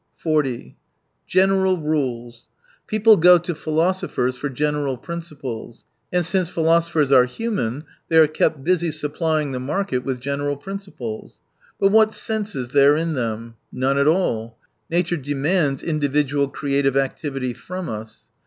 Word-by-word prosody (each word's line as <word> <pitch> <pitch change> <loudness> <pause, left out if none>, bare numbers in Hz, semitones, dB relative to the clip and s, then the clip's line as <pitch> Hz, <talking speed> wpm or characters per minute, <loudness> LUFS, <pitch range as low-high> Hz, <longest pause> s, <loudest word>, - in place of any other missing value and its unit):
218 150 -6 +1
40 65 - -19 0.5
General 190 0 +3
rules. 125 -7 -3 0.2
— - - -34
People 215 0 +5
go 180 +2 +7
to 175 +1 -4
philosophers 155 -5 -1
for 145 +3 -4
general 145 -1 -1
principles. 140 -8 -7 0.3
And 180 -1 +1
since 185 0 0
philo 165 -1 +3
sophers 165 -4 0
are 130 -2 +7
human, 145 - -3 0.3
they 160 - +3
are 160 - +8
kept 155 -1 0
busy 175 0 +1
supplying 155 0 -1
the 130 - -3
market 150 +3 -1
with 130 -2 -3
general 140 +2 -2
principles. 145 - -7 0.4
But 195 - +4
what 220 0 +4
sense 215 -3 -2
is 125 -2 -4
there 140 +2 +5
in 165 0 -1
them? 115 -3 -4
None 135 +2 0
at 140 - +3
all. 115 -10 0 0.3
Nature 175 +1 0
demands 145 +1 0
individual 145 -2 0
creative 140 -1 0
activity 135 -1 -2
from 180 +7 -7
u&. 110 -1 -4
150 Hz, 145 wpm, -22 LUFS, 135-175 Hz, 0.5 s, are